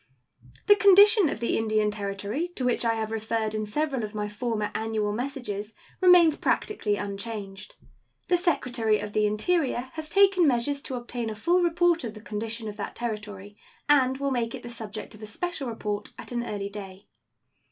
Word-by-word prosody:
The 410 - +7
condition 400 -2 +7
of - - -4
the 235 - 0
Indian 215 -1 +1
Territory, 205 - -3
to 255 - -2
which 245 -1 +1
I 230 -1 +2
have 220 -1 -3
referred 220 0 -2
in 215 -1 -2
several 275 +1 -1
of 215 0 -6
my 210 0 -2
former 210 0 -2
annual 220 -1 -1
messages, 225 -4 -4 0.3
remains 355 -4 +7
practically 210 - 0
unchanged. 200 -1 -6 0.5
The 360 - +3
Secretary 250 - +1
of 210 - -6
the 215 0 +3
Interior 255 +3 0
has 315 -1 -6
taken 390 -3 +5
measures 275 +2 +1
to 265 - -5
obtain 240 -1 -4
a 215 - -5
full 345 +12 +2
report 345 -1 +2
of 225 -2 -5
the - - -9
condition 220 +1 -4
of 210 - -7
that - - -5
Territory, 210 -3 -6 0.3
and 265 -3 +4
will 280 0 -1
make 235 -3 -1
it - - -10
the 240 - -7
subject 220 -2 -7
of 215 - -14
a 215 - -7
special 295 +2 -3
report 210 -2 -4
at - - -9
an 240 -1 -1
early 200 -4 -4
day. 195 -1 -9
230 Hz, 185 wpm, -26 LUFS, 210-280 Hz, 0.5 s, The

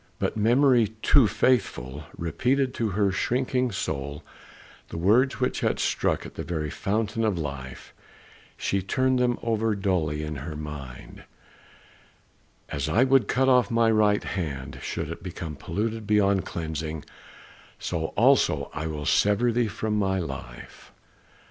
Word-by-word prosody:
But - - -1
memory, 120 +2 +4 0.2
too 135 -6 +6
faithful, 80 - 0
repeated 130 - 0
to 115 -4 -1
her 100 0 +1
shrinking 125 +5 0
soul 70 -6 -4 0.7
the - - -6
words 115 +10 +3
which 125 - 0
had - - 0
struck - - 0
at - - -9
the - - -5
very 80 -4 -3
fountain 110 +2 -1
of 105 -5 +1
life; 70 -5 -6 0.6
she 100 - 0
turned 130 +6 +1
them 125 -1 +2
over 110 -1 +1
dully 85 -6 0
in 75 -1 -4
her 75 +3 -6
mind, 75 -5 -8 1.5
"As 70 +2 -2
I 110 +10 +4
would 135 -4 +4
cut 130 +1 +2
off 125 -2 +4
my 115 -1 +3
right 105 -1 +3
hand, 70 -9 -4
should - - -4
it - - -7
become 80 -2 -6
polluted 105 +8 -3
beyond 100 -3 +2
cleansing, 80 -2 -4 0.7
so 80 -2 -3
also - - +3
will 80 -1 -3
I - - -4
sever 105 +9 +3
thee 120 0 +1
from 105 0 -2
my 95 -1 +1
life." 70 -8 -7
100 Hz, 140 wpm, -26 LUFS, 80-115 Hz, 1.5 s, too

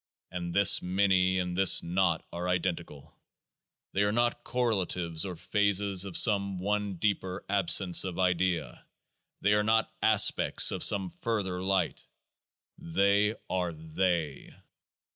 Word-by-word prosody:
Any 85 -1 -5
this 100 +2 +4
Many 95 0 +1
and 90 -1 -3
this 95 0 +5
Naught 85 -1 -1
are 90 +1 -4
identical; 85 -5 -4 0.8
they 100 - 0
are 100 0 +1
not 120 +1 -1
correlatives 95 -8 -2
or 90 - -7
phases 100 +1 0
of 95 -3 -4
some 100 -3 +3
one 105 +1 -3
deeper 95 -1 -3
Absence 95 -2 +3
of 90 -2 -6
Idea; 90 -1 -1 0.6
they 105 +1 +2
are 105 - +2
not 110 +1 0
aspects 110 -2 +3
of - - -1
some 95 -3 +3
further 100 -6 -4
Light: 95 -2 -1 0.8
they 100 +5 0
are 90 -2 -3
They 80 -1 -4
95 Hz, 125 wpm, -28 LUFS, 90-100 Hz, 0.8 s, this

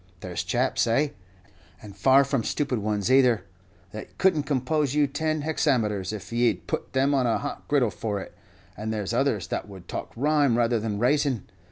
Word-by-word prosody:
There's 90 -1 -4
chaps, 120 +7 +1
ay, 140 +6 +1 0.7
and 105 -2 -12
far 130 +8 +5
from 135 -3 -1
stupid 135 -2 -1
ones 105 +2 -1
either, 125 -6 +4 0.5
that 110 - -9
could 190 -2 +4
n't 150 -2 -2
compose 145 +1 0
you 150 -1 +4
ten 155 +2 -1
hexameters 115 - 0
if 110 +1 -7
ye'd 120 0 +1
put - - -4
them 135 +2 +2
on 130 -3 +2
a 115 - +2
hot 145 - -6
griddle 130 -7 +2
for 100 +3 -3
it; - - -9 0.4
and 110 +1 -4
there's 105 -5 -3
others - - +1
that - - -3
would 95 -3 -12
talk - - -5
rhyme 145 -1 +2
rather 120 -1 +2
than 105 -1 -3
rayson! 130 -1 +1
125 Hz, 185 wpm, -26 LUFS, 105-145 Hz, 0.7 s, far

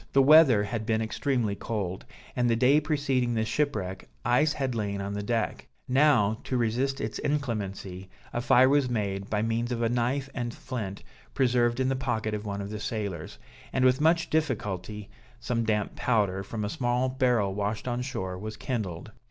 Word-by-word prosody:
The 135 - +6
weather 140 -7 +7
had 110 +1 -3
been 110 -1 +2
extremely 115 -1 0
cold, 100 -3 -4 0.3
and 120 -1 +2
the 115 - +3
day 130 +6 +4
preceding 135 -6 0
the 110 0 +1
shipwreck 110 - -2 0.2
ice 150 +5 +3
had 135 -3 -2
lain 100 -3 -2
on 100 0 -3
the 105 - -2
deck; 115 +2 -2 0.2
now, 125 -6 +3
to 130 - -1
resist 125 +4 0
its 110 - -3
inclemency, 100 -9 -3 0.2
a 120 - -1
fire 125 +1 +5
was 140 -1 +3
made, 100 -4 -2
by 105 0 0
means 115 +2 -1
of 120 -1 -1
a 115 - +2
knife 125 +3 0
and 120 -2 -3
a - - -12
flint 105 -7 -5 0.3
preserved 120 -2 +2
in 130 0 +2
the 135 - +1
pocket 110 -4 -2
of 105 0 -4
one 100 0 -3
of 100 +1 -6
the 105 - -4
sailors; 100 -6 -4 0.3
and 130 - +2
with 130 +2 +4
much 165 +2 +3
difficulty, 105 - -2 0.3
some 115 - -1
damp 105 -2 0
powder, 100 -6 +1
from 105 +2 -4
a - - -2
small 125 +3 0
barrel 125 -6 +1
washed 105 +4 -2
on 120 0 -1
shore, 95 -8 -4
was 110 +1 -6
kindled. 110 - -4
115 Hz, 185 wpm, -28 LUFS, 105-130 Hz, 0.3 s, weather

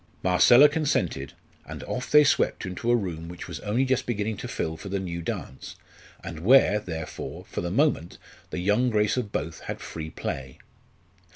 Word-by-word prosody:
Marcella 120 +10 +7
consented; 95 - -1 0.3
and - - -8
off 125 0 -4
they 150 0 +7
swept 145 - +1
into 95 +6 -4
a 120 - +5
room 85 -7 -3
which 90 - -8
was 85 -3 -6
only 115 +6 0
just 130 0 0
beginning 110 -2 -1
to - - -6
fill 80 - -3
for 95 +5 -9
the 100 +1 -1
new 85 -2 -4
dance, 65 -5 -6 0.5
and 85 -4 -6
where, 105 +2 +5
therefore, 80 -6 -6
for - - -4
the 85 - -3
moment 115 - +1 0.3
the - - -5
young 105 +7 +2
grace 105 -2 +2
of 120 -5 -3
both 80 +3 -3
had - - -6
free 80 -1 -6
play. 65 -3 -5
95 Hz, 180 wpm, -26 LUFS, 85-120 Hz, 0.5 s, Marcella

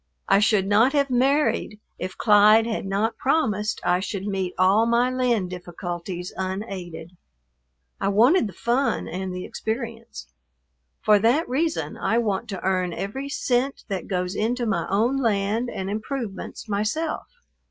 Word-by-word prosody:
I 195 - +5
should 210 -2 +3
not 220 +7 +4
have 280 -2 +1
married 260 -4 +1 0.2
if 185 0 -5
Clyde 215 +1 +6
had 220 -4 -3
not 215 +4 -1
promised 215 -8 0
I 180 0 +2
should 195 0 -4
meet 190 -3 -2
all 195 +5 +4
my 240 +2 +2
land 240 -8 0
difficulties 175 0 -6
unaided. 185 -4 -5 0.9
I - - -1
wanted 235 - +4
the 195 - -9
fun 250 +4 0
and 185 +2 -4
the 180 0 -5
experience. 225 - -5 0.8
For 210 -1 +5
that 240 +10 +2
reason 315 +6 -1
I 225 - 0
want 220 -1 -1
to 195 -3 -5
earn 185 -2 0
every 265 +11 -4
cent 270 -2 -1
that 190 -3 -3
goes 180 0 -2
into 240 +4 0
my 185 -7 -1
own 230 +7 +2
land 220 -1 0
and 190 -4 -4
improvements 215 0 -5
myself. 215 +11 -2
210 Hz, 145 wpm, -24 LUFS, 190-240 Hz, 0.9 s, Clyde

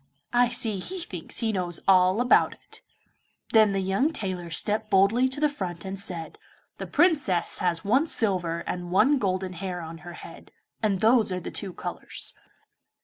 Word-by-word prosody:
I 245 0 +4
see 225 -4 0
he 370 - -4
thinks 180 - -6
he 225 -1 +1
knows 180 -4 -2
all 185 +2 +5
about 245 - +4
it.' - - -15 0.7
Then 215 -2 +5
the 195 - 0
young 195 +11 +1
tailor 185 - -3
stepped 210 +6 -1
boldly 205 +7 +4
to 265 - -3
the 300 - +4
front 185 - -6
and 190 0 -4
said, 170 -5 -6 0.4
'The - - -5
Princess 290 - +2
has 175 -1 0
one 260 +10 +3
silver 180 - 0
and 175 -1 -4
one 245 +10 +4
golden 185 -3 -1
hair 180 0 -5
on 165 0 -8
her 175 +1 -10
head, - - -12 0.3
and 200 -4 0
those 225 -2 +4
are 180 - -2
the 175 - -7
two 195 -3 -3
colours. - - -5
195 Hz, 175 wpm, -26 LUFS, 180-230 Hz, 0.7 s, all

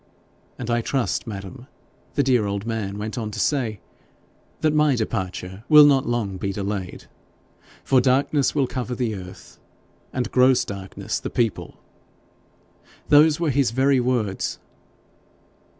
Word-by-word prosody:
"And 120 -1 -4
I 120 0 +1
trust, 130 0 -2
madam," 105 +5 -8 0.5
the 140 - +2
dear 125 -5 +2
old 100 +1 -3
man 110 -4 -3
went 110 +3 -4
on 110 -2 -4
to 105 - -7
say, 120 -8 -1 0.8
"that 155 -1 +2
my 150 -3 +3
departure 95 -3 -4
will 150 -1 +9
not 135 -2 +3
long 110 -5 -2
be 100 +1 -3
delayed, 100 -2 -5 0.8
for 130 -2 +3
darkness 135 +3 +1
will 140 -2 +2
cover 125 -1 -4
the 120 -3 -1
earth, 95 -2 -11 0.5
and 125 -1 -3
gross 130 0 +4
darkness 95 -1 -5
the - - -5
people." 115 -4 -2 1.3
Those 150 +1 +5
were 165 -4 +1
his 135 -2 +2
very 135 +3 +2
words.' 120 -6 -1
120 Hz, 135 wpm, -23 LUFS, 100-135 Hz, 1.3 s, will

